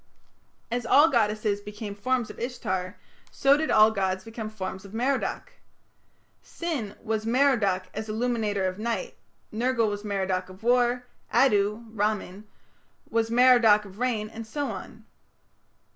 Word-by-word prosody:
As 245 +1 -1
all 290 +7 +6
goddesses 215 -3 +1
became 210 0 -7
forms 245 +3 -1
of - - -14
Ishtar, 190 -7 -3 0.3
so 275 +1 +4
did 315 +2 -1
all 215 +1 +6
gods 190 -2 -1
become 225 0 -6
forms 190 -3 -6
of 200 +2 -11
Merodach. 260 +4 -1 0.9
Sin 285 -12 -4
was 220 0 -2
"Merodach 230 -7 +2
as 220 +1 -5
illuminator 215 -3 -1
of 185 +1 -3
night", 235 - -3 0.4
Nergal 230 0 +1
was 205 0 -5
"Merodach 190 -3 -2
of 185 +3 -14
war", 245 +1 +2 0.3
Addu 210 -3 +2
(Ramman) 210 -1 -2 0.7
was 225 0 +1
"Merodach 235 -3 +5
of 195 +1 -13
rain", 235 -4 0
and 225 +1 -9
so 285 +5 -3
on. - - -9
220 Hz, 135 wpm, -26 LUFS, 205-245 Hz, 0.9 s, all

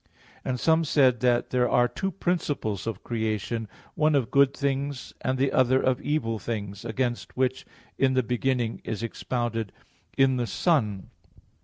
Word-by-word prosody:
And 125 -1 -2
some 160 +3 +3
said 130 -5 +3
that 120 0 +2
there 125 -1 +2
are 120 0 +4
two 190 - -3
principles 150 - -2
of 110 -4 -4
creation, 110 0 -2 0.3
one 155 0 +2
of 130 -5 +1
good 140 -1 +5
things 140 -1 -2
and 130 0 0
the 135 +1 +1
other 130 0 +4
of 130 -1 +1
evil 115 -7 -1
things, 100 -3 -5
against 120 +2 -3
which 130 0 0 0.3
"In 130 -1 +3
the 130 - +3
beginning" 125 0 -1
is 110 0 -4
expounded 115 -2 -2 0.5
"in 135 -1 +4
the 120 -1 -1
Son." 110 - 0
125 Hz, 155 wpm, -26 LUFS, 115-135 Hz, 0.5 s, good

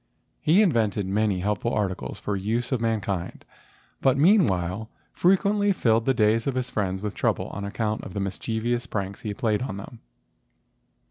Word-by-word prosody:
He 175 +8 +5
invented 110 - +1
many 100 -1 0
helpful 105 +4 -1
articles 95 -11 -2
for 105 - -2
the 95 - -4
use 120 +5 -1
of 125 -4 0
mankind, 100 -6 -2 0.6
but 135 0 +3
meanwhile 110 - +3 0.2
frequently 200 +3 +3
filled 115 -8 +2
the 135 - +4
days 110 +1 +2
of 135 - 0
his 125 -1 -2
friends 95 -2 -2
with 105 - -2
trouble - - 0
on 100 0 -5
account 105 +1 -2
of 95 - -9
the - - -1
mischievous 115 +5 -2
pranks 100 -1 -4
which 110 - -4
he - - -2
played 105 -2 0
on 125 -7 -4
them. 110 +4 -9
110 Hz, 175 wpm, -25 LUFS, 100-125 Hz, 0.6 s, He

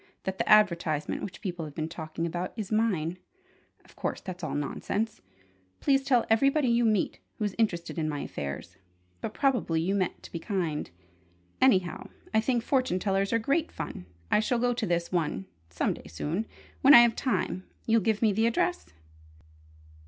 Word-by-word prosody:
That 190 0 -4
the - - -1
advertisement 170 -8 +3
which 190 -1 -7
people 175 -4 -4
have 150 -2 -10
been 155 -1 -2
talking 165 0 -5
about 175 +2 -3
is 215 -3 -5
mine. 185 -6 0 0.7
Of - - -20
course - - -3
that's 180 -2 -8
all 155 - -2
nonsense! 205 +9 -2 0.6
Please 275 -1 +3
tell 260 -3 +2
everybody 275 +4 +3
you 235 0 +3
meet, 215 -4 +1 0.2
who's 205 -3 -1
interested 175 -6 0
in 155 -1 0
my 145 -1 -3
affairs! 75 +5 -6 0.4
But 210 - -5
probably 245 - +1
you 175 +4 0
meant 190 -3 -1
to - - -11
be 170 - -4
kind. 170 -6 -2 0.7
Anyhow, 190 -9 +3 0.2
I 220 - +4
think 240 0 0
fortune 255 -9 +1
tellers 195 +1 0
are 230 - +3
great 280 +8 0
fun! 90 - -6 0.2
I - - +5
shall 225 +3 +1
go 245 +1 +2
to 235 -3 -2
this 170 0 0
one 155 - -1 0.2
some 85 - 0
day - - -12
soon: 155 - -3 0.3
when 275 +2 +9
I 240 - +11
have 235 -1 +4
time. 185 -8 -1 0.2
You'll 225 0 +3
give 220 0 +1
me 215 -2 +4
the 220 +3 +2
address?" 350 +9 0
195 Hz, 175 wpm, -28 LUFS, 170-230 Hz, 0.7 s, I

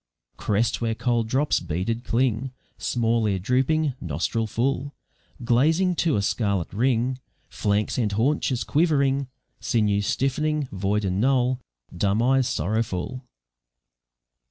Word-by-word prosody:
Crest 110 +3 0
where 115 -1 0
cold 120 -1 0
drops 135 +6 +1
beaded 90 +8 -3
cling, 125 +1 0 0.3
Small 115 -2 +1
ear 95 - 0
drooping, 130 - +1
nostril 85 +8 -1
full, 135 +5 -1 0.5
Glazing 160 +10 +3
to 165 -4 +2
a 100 - 0
scarlet 100 -5 -1
ring, 125 +3 +1 0.3
Flanks 105 +4 0
and 110 -4 +1
haunches 125 +3 0
quivering, 140 -4 +2 0.3
Sinews 105 -3 +1
stiff'ning, 150 +2 0
void 100 +2 -1
and 95 +1 0
null, 130 0 +2 0.4
Dumb 100 +4 +1
eyes 130 0 +3
sorrowful. 110 - -2
120 Hz, 115 wpm, -24 LUFS, 105-135 Hz, 0.5 s, Glazing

